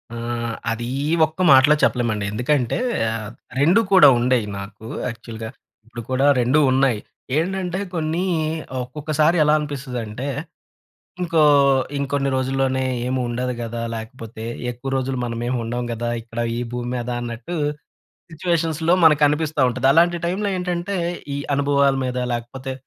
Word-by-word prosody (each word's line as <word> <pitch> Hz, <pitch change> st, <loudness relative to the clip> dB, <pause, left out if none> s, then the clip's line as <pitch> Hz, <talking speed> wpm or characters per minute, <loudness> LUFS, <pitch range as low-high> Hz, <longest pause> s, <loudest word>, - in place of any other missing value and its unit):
ఆ! -, -, -5 dB, 0.5 s
అదీ 115 Hz, +1 st, -3 dB, 0.2 s
ఈ -, -, -1 dB, 0.2 s
ఒక్క 160 Hz, +3 st, -7 dB
మాటలో 135 Hz, +3 st, +7 dB
చెప్పలేమండి. 110 Hz, -5 st, +1 dB
ఎందుకంటే, 125 Hz, +3 st, 0 dB, 0.3 s
ఆహ్, 110 Hz, -1 st, -4 dB, 0.3 s
రెండూ 170 Hz, +10 st, +5 dB
కూడా 190 Hz, -5 st, +8 dB
ఉండేయి 125 Hz, -2 st, +2 dB
నాకు 105 Hz, +2 st, -10 dB, 0.2 s
యాక్చువల్‌గా. 115 Hz, -1 st, -7 dB, 0.4 s
ఇప్పుడు 120 Hz, 0 st, -8 dB
కూడా 135 Hz, +2 st, +3 dB
2 125 Hz, +5 st, +3 dB
ఉన్నాయి. 130 Hz, -4 st, +2 dB, 0.4 s
ఏంటంటే, 185 Hz, +2 st, -1 dB
కొన్నీ 165 Hz, +1 st, -1 dB, 0.6 s
ఒక్కొక్కసారి 155 Hz, +5 st, 0 dB
ఎలా 150 Hz, 0 st, +4 dB
అనిపిస్తుందంటే, 130 Hz, -5 st, -5 dB, 1.0 s
ఇంకో 165 Hz, -3 st, +2 dB, 0.6 s
ఇంకొన్ని 140 Hz, 0 st, -1 dB
రోజుల్లోనే 130 Hz, 0 st, 0 dB, 0.2 s
ఏమి 130 Hz, 0 st, -1 dB
ఉండదు 125 Hz, +1 st, -2 dB
గదా! 115 Hz, 0 st, -4 dB
లేకపోతే, 110 Hz, 0 st, -8 dB, 0.3 s
ఎక్కువ 125 Hz, +3 st, -6 dB
రోజులు 130 Hz, 0 st, -2 dB
మనమేమి 120 Hz, +1 st, -2 dB
ఉండం 120 Hz, +2 st, -3 dB
గదా! 120 Hz, +1 st, -2 dB
ఇక్కడ 115 Hz, 0 st, -10 dB, 0.2 s
ఈ -, -, -1 dB
భూమి 120 Hz, 0 st, -3 dB
మీద 120 Hz, 0 st, -4 dB
అన్నట్టూ, 120 Hz, +8 st, -5 dB, 0.8 s
సిచ్యువేషన్స్‌లో 165 Hz, 0 st, 0 dB
మనకనిపిస్తా 150 Hz, 0 st, +3 dB
ఉంటది. 130 Hz, +1 st, 0 dB
అలాంటి 170 Hz, +2 st, +4 dB
టైమ్‌లో 195 Hz, +4 st, -1 dB
ఏంటంటే, 180 Hz, +2 st, -2 dB, 0.4 s
ఈ -, -, -3 dB, 0.2 s
అనుభవాల 140 Hz, -1 st, +3 dB
మీద, 125 Hz, 0 st, -3 dB, 0.2 s
లేకపోతే 130 Hz, +3 st, -5 dB
130 Hz, 130 wpm, -21 LUFS, 120-155 Hz, 1.0 s, కూడా